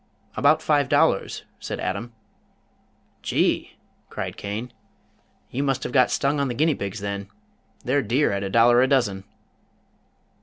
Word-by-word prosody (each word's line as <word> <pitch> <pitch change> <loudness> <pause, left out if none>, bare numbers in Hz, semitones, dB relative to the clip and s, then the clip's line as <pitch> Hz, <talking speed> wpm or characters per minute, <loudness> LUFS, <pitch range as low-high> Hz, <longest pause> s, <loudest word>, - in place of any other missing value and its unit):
"About 145 +5 +3
five 145 -3 +2
dollars," - - +2 0.2
said - - -5
Adam. 120 +1 -3 1.1
"Gee!" - - 0 0.3
cried - - -5
Cain. 110 +4 -5 0.8
"You 130 - -2
must 135 -2 0
have - - -4
got 130 -1 +4
stung 140 +1 0
on 140 - +1
the 120 - -3
guinea 155 +4 +3
pigs, 100 -3 -5
then. 100 0 -4 0.6
They're 140 +3 +2
dear 125 +7 +1
at 100 0 -2
a 100 - -3
dollar 120 +3 +5
a 130 - +4
dozen." 110 -8 +1
125 Hz, 145 wpm, -24 LUFS, 100-140 Hz, 1.1 s, dollar